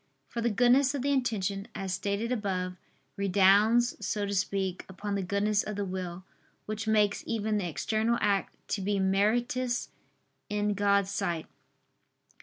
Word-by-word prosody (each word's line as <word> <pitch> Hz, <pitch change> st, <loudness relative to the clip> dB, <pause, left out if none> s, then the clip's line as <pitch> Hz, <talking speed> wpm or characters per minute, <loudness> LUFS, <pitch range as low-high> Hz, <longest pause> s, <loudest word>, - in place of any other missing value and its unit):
For 235 Hz, -, -3 dB
the 235 Hz, -, +2 dB
goodness 250 Hz, +5 st, +4 dB
of 265 Hz, -, -2 dB
the 285 Hz, -, +1 dB
intention, 205 Hz, -7 st, -1 dB
as 190 Hz, -1 st, -3 dB
stated 200 Hz, +5 st, -2 dB
above, 185 Hz, -6 st, -2 dB, 0.4 s
redounds, 200 Hz, +5 st, +4 dB
so 205 Hz, -2 st, -1 dB
to 200 Hz, -, -3 dB
speak, 195 Hz, -1 st, -1 dB
upon 200 Hz, +2 st, -5 dB
the 200 Hz, -, 0 dB
goodness 200 Hz, +2 st, +1 dB
of 210 Hz, -, -5 dB
the 200 Hz, 0 st, -2 dB
will, 185 Hz, -1 st, -5 dB, 0.4 s
which 215 Hz, +1 st, -4 dB
makes 210 Hz, -2 st, +2 dB
even 215 Hz, -2 st, 0 dB
the 180 Hz, -3 st, -2 dB
external 220 Hz, +8 st, 0 dB
act 200 Hz, -1 st, 0 dB
to 200 Hz, -, -1 dB
be 200 Hz, +1 st, 0 dB
meritorious 235 Hz, +6 st, +1 dB, 0.6 s
in 210 Hz, 0 st, 0 dB
God's 200 Hz, -1 st, +2 dB
sight. 170 Hz, -4 st, -2 dB
205 Hz, 150 wpm, -29 LUFS, 195-225 Hz, 0.6 s, goodness